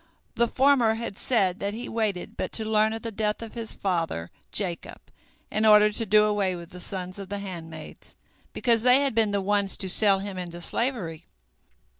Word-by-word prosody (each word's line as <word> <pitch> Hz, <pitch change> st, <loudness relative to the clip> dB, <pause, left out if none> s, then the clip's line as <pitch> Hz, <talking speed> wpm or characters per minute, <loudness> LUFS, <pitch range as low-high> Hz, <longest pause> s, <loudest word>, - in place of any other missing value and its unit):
The 235 Hz, -, +2 dB
former 255 Hz, -4 st, +3 dB
had 230 Hz, -3 st, -5 dB
said 195 Hz, -6 st, +1 dB
that 200 Hz, +1 st, -3 dB
he 240 Hz, +2 st, -6 dB
waited 215 Hz, -5 st, -2 dB
but -, -, -3 dB
to 220 Hz, -, 0 dB
learn 215 Hz, 0 st, +2 dB
of 225 Hz, 0 st, -5 dB
the 230 Hz, -, -4 dB
death 210 Hz, +1 st, -2 dB
of 225 Hz, -, -9 dB
his 230 Hz, -1 st, -3 dB
father 165 Hz, -, -2 dB, 0.2 s
Jacob 180 Hz, -5 st, -1 dB, 0.5 s
in 215 Hz, -, 0 dB
order 210 Hz, -1 st, +7 dB
to 225 Hz, +2 st, +1 dB
do 210 Hz, +2 st, +6 dB
away 205 Hz, -3 st, +1 dB
with 170 Hz, 0 st, -10 dB
the 180 Hz, -, -9 dB
sons 185 Hz, +1 st, -5 dB
of 195 Hz, -1 st, -8 dB
the 205 Hz, -, -3 dB
handmaids, 165 Hz, -5 st, -9 dB, 0.4 s
because 235 Hz, -3 st, +1 dB
they 250 Hz, +3 st, +5 dB
had 275 Hz, -3 st, +1 dB
been 220 Hz, -1 st, +2 dB
the 200 Hz, -1 st, 0 dB
ones 200 Hz, 0 st, +1 dB
to 190 Hz, -, -4 dB
sell 195 Hz, +1 st, +3 dB
him 195 Hz, -1 st, -5 dB
into 175 Hz, -1 st, -6 dB
slavery. 175 Hz, -, -3 dB
205 Hz, 195 wpm, -26 LUFS, 185-225 Hz, 0.5 s, order